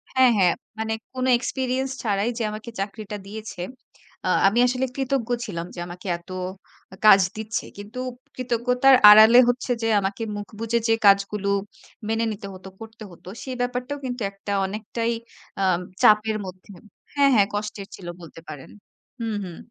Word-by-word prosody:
হ্যাঁ, 260 -2 +6
হ্যাঁ 180 -3 +4 0.3
মানে 220 0 -1 0.2
কোনো 255 0 -1
এক্সপেরিয়েন্স 260 +1 -2
ছাড়াই 205 +1 0
যে 230 - -1
আমাকে 215 +2 -7
চাকরিটা 205 +1 -5
দিয়েছে। 215 -3 -7 0.6
অ - - 0 0.2
আমি 225 +5 +2
আসলে 255 +1 0
কৃতজ্ঞ 265 -3 -1 0.2
ছিলাম 170 -4 -5
যে 175 - -7
আমাকে 180 +3 -9
এত 170 +1 -22 0.6
আ - - -9
কাজ 195 -2 +9 0.2
দিচ্ছে। 220 +1 -3
কিন্তু 210 +5 -8 0.4
কৃতজ্ঞতার 250 +2 +3
আড়ালে 220 +3 +9
হচ্ছে 250 +1 -1
যে - - +1
আমাকে 195 +3 -3
মুখ 205 -1 -6
বুজে 230 +1 0
যে 225 - +4
কাজগুলো 200 0 +3 0.6
মেনে 225 +1 +1
নিতে 205 -1 -7
হতো, 185 0 -11
করতে 225 0 -11
হতো। 175 - -17 0.2
সেই 260 -1 -5
ব্যাপারটাও 250 +3 -2
কিন্তু 245 -1 -4
একটা 200 +1 -8
অনেকটাই 220 +3 -3 0.5
আ - - +2 0.4
চাপের 215 0 +4
মধ্যে 185 +1 -11 0.5
হ্যাঁ, 280 -1 +5
হ্যাঁ 200 -2 +5
কষ্টের 205 -1 -4
ছিল 180 - -11
বলতে 165 0 -12
পারেন। 145 -3 -9 0.5
হুম, 225 -2 -2
হুম। 175 -3 -8
220 Hz, 160 wpm, -24 LUFS, 200-245 Hz, 0.6 s, কাজ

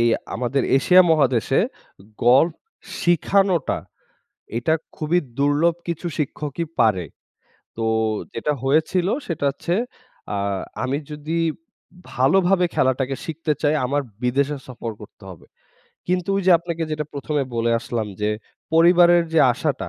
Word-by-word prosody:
এই 120 - +4 0.3
আমাদের 125 +3 -1 0.2
এশিয়া 185 +6 +6
মহাদেশে 130 -8 +2 0.7
গল্ফ 135 +7 +5 0.4
শিখানোটা 175 -1 +2 0.8
এটা 160 +7 +1 0.2
খুবই 160 +3 +1 0.2
দুর্লভ 145 +4 +2
কিছু 170 +1 -3
শিক্ষকই 150 +2 -3
পারে। 95 -7 +2 0.7
তো 115 - -2 0.5
যেটা 150 +6 -1
হয়েছিল 160 +6 +1 0.2
সেটা 165 -4 -3
হচ্ছে, 170 +5 -3 0.6
আ - - -1 0.5
আমি 130 +2 -1
যদি 150 +2 -3 0.7
ভালোভাবে 180 +8 +3
খেলাটাকে 130 0 +1
শিখতে 160 -1 -2
চাই 150 +1 +3
আমার 145 +2 0 0.2
বিদেশে 140 +4 +1
সফর 120 -2 -6
করতে 105 0 -14
হবে। 90 - -13 0.6
কিন্তু 180 0 -1
ওই 195 - 0
যে - - +6
আপনাকে 170 -1 -4
যেটা 150 0 -2
১ম 145 +1 -5
এ - - -3
বলে 115 0 +1
আসলাম 115 -3 -3
যে, 105 0 +1 0.4
পরিবারের 175 +1 +6
যে 165 - +3
আশাটা 140 +2 -2
150 Hz, 125 wpm, -22 LUFS, 130-170 Hz, 0.8 s, এশিয়া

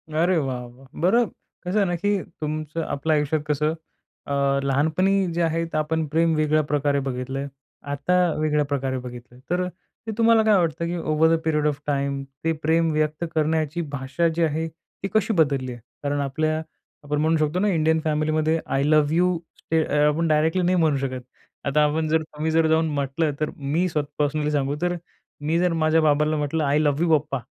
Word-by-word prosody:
अरे 170 +4 +2
वाह! 130 -5 -2
वाह! 125 +3 -16
बरं 230 +8 +4 0.4
कसं 180 +4 -1
आहे 205 - +4
ना, 175 - 0
की 205 +2 0 0.2
तुमचं 155 +1 -3
आपल्या 155 +1 0
आयुष्यात 150 +1 0
कसं 150 +1 +1 0.5
अ, 140 - -2 0.3
लहानपणी 160 +8 +2
जे 170 - -1
आहे 165 0 +1
ते 165 - -4
आपण 160 +1 0
प्रेम 165 +2 +2
वेगळ्या 155 0 +2
प्रकारे 145 -1 0
बघितलं 130 +1 -3
आहे. 140 - -3 0.4
आता 145 +6 0 0.2
वेगळ्या 150 -1 +1
प्रकारे 135 -2 -2
बघितलं. 125 0 -10
तर 180 +1 0 0.4
ते - - -1
तुम्हाला 230 -1 +5
काय 215 -1 +4
वाटतं, 170 -1 0
की 175 +1 -2
over 160 -1 +2
the - - -2
period 150 -2 +1
of 145 -2 -1
time 140 -1 -1 0.2
ते 165 - +2
प्रेम 165 +1 +3
व्यक्त 155 +1 0
करण्याची 155 +1 0
भाषा 140 +5 0
जी 170 - +1
आहे 160 +1 0
ती 165 +4 -9
कशी 220 0 +2
बदलली 140 -7 +1
आहे? 120 -1 -9 0.2
कारण 145 0 -1
आपल्या 155 +3 -1 0.4
आपण 145 0 -1
म्हणू 160 +1 +2
शकतो 155 +3 0
ना, 205 - +2
इंडियन 160 -3 +2
फॅमिलीमध्ये 155 +1 +1
आय 135 - 0
लव्ह 150 0 +3
यू 180 0 +2 0.2
स्टे 160 0 0
अ, 150 -1 +2
आपण 160 +3 +1
डायरेक्टली 160 +3 +2
नाही 180 +1 +2
म्हणू 155 -4 +3
शकत. 130 -2 -3 0.4
आता 150 +2 +3
आपण 155 +2 0
जर 160 +1 +2
तुम्ही 155 +1 -4
जर 160 0 +3
जाऊन 160 +1 +3
म्हटलं, 140 +3 0
तर 155 - 0
मी 150 +6 0
स्वतः 150 -3 -2
पर्सनली 150 +1 0
सांगू, 140 -1 0
तर 175 0 0 0.5
मी 155 +3 0
जर 180 -1 +2
माझ्या 160 0 +3
बाबाला 150 0 +2
म्हटलं, 150 +2 -1
"आय 145 +1 +2
लव्ह 145 0 +1
यू 175 - +1
पप्पा", 145 -2 -4
155 Hz, 195 wpm, -24 LUFS, 145-165 Hz, 0.5 s, तुम्हाला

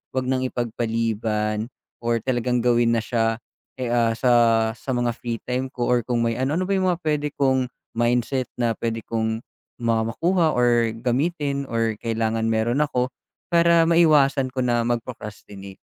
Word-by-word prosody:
wag 130 - +1
nang 130 0 0
ipagpaliban 110 -2 -2 0.4
or 115 0 +1
talagang 125 -1 0
gawin 120 -1 +3
na 115 - 0
siya, 115 0 0 0.4
eh, 125 -2 -2
ah, 115 -1 +2
sa 125 +2 +2 0.5
sa 130 - -5
mga 120 -1 +1
free 115 -1 -4
time 130 +1 -2
ko 125 -3 -2
or 125 -1 +3
kung 120 -2 +1
may 115 +1 -1
ano 135 +4 0
Ano - - 0
ba - - +2
yung 185 -1 +1
mga 175 - -3
puwede 150 -1 0
kong 130 -2 +2 0.3
mindset 120 +2 +1
na 120 -1 0
puwede 115 -1 -3
kong 110 0 -2 0.4
ma 115 -1 +1
makuha 165 +6 +1
or 120 -2 +3
gamitin 140 +2 -1
or 115 -2 -1
kailangan 115 -1 -1
meron 115 +4 +1
ako 125 -3 -1 0.4
para 170 -1 +5
maiwasan 150 -5 +4
ko 130 0 -2
na 120 -1 +1
mag-procrastinate? 105 -5 -6
120 Hz, 160 wpm, -23 LUFS, 115-130 Hz, 0.5 s, para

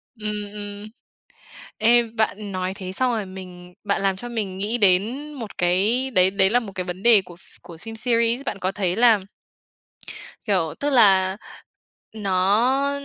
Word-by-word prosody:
Ừm, 210 -2 -5
ừm. 205 0 -8 0.9
Ê, 240 +1 +5
bạn 210 -2 -2
nói 185 0 -3
thế 185 -1 -7
xong 255 +6 0
rồi 215 -4 -2
mình 180 -1 -11
bạn 200 -1 -1
làm 195 -1 +1
cho 240 +6 -6
mình 210 -6 -4
nghĩ 210 +5 -1
đến 220 +9 +1
một 230 -7 -9
cái 205 +9 +1
đấy 185 -5 +4
đấy 190 -1 +3
là 245 +2 +3
một 210 -5 -9
cái 185 - -3
vấn 180 +1 -7
đề 225 -3 +6
của 175 -2 -13
ph - - -18
của 170 - -12
phim 225 +6 -9
series. 235 +2 +1
Bạn 200 - -4
có 185 0 -2
thấy 190 -3 -2
là 230 -2 +5 1.3
kiểu, 180 -8 0
tức 290 - 0
là 195 -7 +4 0.8
nó 215 +7 +1
205 Hz, 170 wpm, -22 LUFS, 185-230 Hz, 1.3 s, đề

